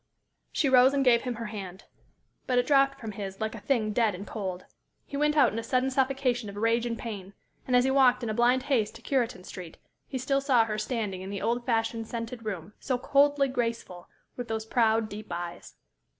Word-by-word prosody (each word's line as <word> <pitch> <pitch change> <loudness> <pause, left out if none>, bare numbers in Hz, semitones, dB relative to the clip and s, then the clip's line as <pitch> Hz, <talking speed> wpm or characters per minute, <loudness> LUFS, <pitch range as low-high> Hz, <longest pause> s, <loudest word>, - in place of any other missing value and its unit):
She 285 - +1
rose 260 +1 +6
and 275 -1 +1
gave 235 -2 +5
him 250 -2 -3
her 230 +1 -5
hand. 195 -3 -7 0.6
But 250 - +1
it 245 - +3
dropped 275 0 +3
from 225 -4 -6
his 195 -1 -6
like 220 0 -2
a 230 - -7
thing 215 -2 0
dead 220 -4 +2
and 195 +3 -7
cold. 190 -5 -5 0.4
He - - -8
went 300 +1 +1
out 285 - +5
in 225 - -2
a - - -5
sudden 255 +3 +1
suffocation 260 -4 0
of 200 - -9
rage 230 +3 +1
and 230 -1 -3
pain; 200 -4 -7 0.3
and 250 - +2
as 245 - +5
he 265 - +2
walked 255 -2 +4
in 230 - -2
a - - -2
blind 245 +3 +3
haste 225 -7 0
to 235 - -13
Cureton 240 -8 -1
Street, 180 -3 -9 0.3
he 265 - -4
still 275 +2 0
saw 255 -5 +4
her 215 -1 -3
standing 215 -5 -3
in 190 - -7
the 200 0 -4
old 240 +2 -1
fashioned, 225 -1 0
scented 230 0 -5
room, 195 -2 -5
so 255 - -1
coldly 280 +2 +3
graceful, 230 -8 -3 0.3
with 245 -1 -5
those 220 -1 -3
proud, 225 -1 +2
deep 215 0 -8
eyes. 175 0 -6
230 Hz, 220 wpm, -28 LUFS, 215-255 Hz, 0.6 s, rose